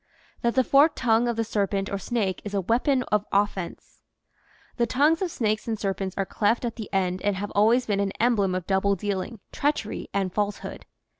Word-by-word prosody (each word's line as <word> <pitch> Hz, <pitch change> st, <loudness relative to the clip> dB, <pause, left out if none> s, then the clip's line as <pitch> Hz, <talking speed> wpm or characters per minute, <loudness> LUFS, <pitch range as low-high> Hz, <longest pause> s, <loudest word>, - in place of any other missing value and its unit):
THAT 235 Hz, 0 st, +1 dB
THE 260 Hz, -, +4 dB
FORKED 290 Hz, +4 st, +5 dB
TONGUE 235 Hz, -1 st, +2 dB
OF 235 Hz, -, 0 dB
THE 225 Hz, -, 0 dB
SERPENT 200 Hz, -2 st, -1 dB
OR 200 Hz, -, -2 dB
SNAKE 205 Hz, -5 st, -1 dB
IS 205 Hz, -1 st, -5 dB
A 195 Hz, -, +1 dB
WEAPON 250 Hz, -, +1 dB
OF 210 Hz, -1 st, +3 dB
OFFENSE 195 Hz, -3 st, -2 dB, 0.8 s
HE 235 Hz, -, +4 dB
tongues 300 Hz, +6 st, +3 dB
of 375 Hz, -, 0 dB
snakes 215 Hz, -7 st, -1 dB
and 225 Hz, -1 st, -1 dB
serpents 195 Hz, -2 st, -3 dB
are 195 Hz, -, 0 dB
cleft 220 Hz, +6 st, 0 dB
at 235 Hz, -, -3 dB
the 220 Hz, -3 st, -7 dB
end 185 Hz, -2 st, 0 dB
and 205 Hz, -1 st, +1 dB
have 200 Hz, +2 st, -4 dB
always 230 Hz, +5 st, +3 dB
been 205 Hz, -3 st, 0 dB
an 200 Hz, -1 st, 0 dB
emblem 210 Hz, -6 st, +2 dB
of 185 Hz, -2 st, -3 dB
double 195 Hz, +1 st, +2 dB
dealing, 200 Hz, +2 st, -4 dB
treachery, 285 Hz, -7 st, -2 dB
and 190 Hz, -2 st, -1 dB
falsehood. 205 Hz, -1 st, -3 dB
205 Hz, 200 wpm, -25 LUFS, 195-235 Hz, 0.8 s, FORKED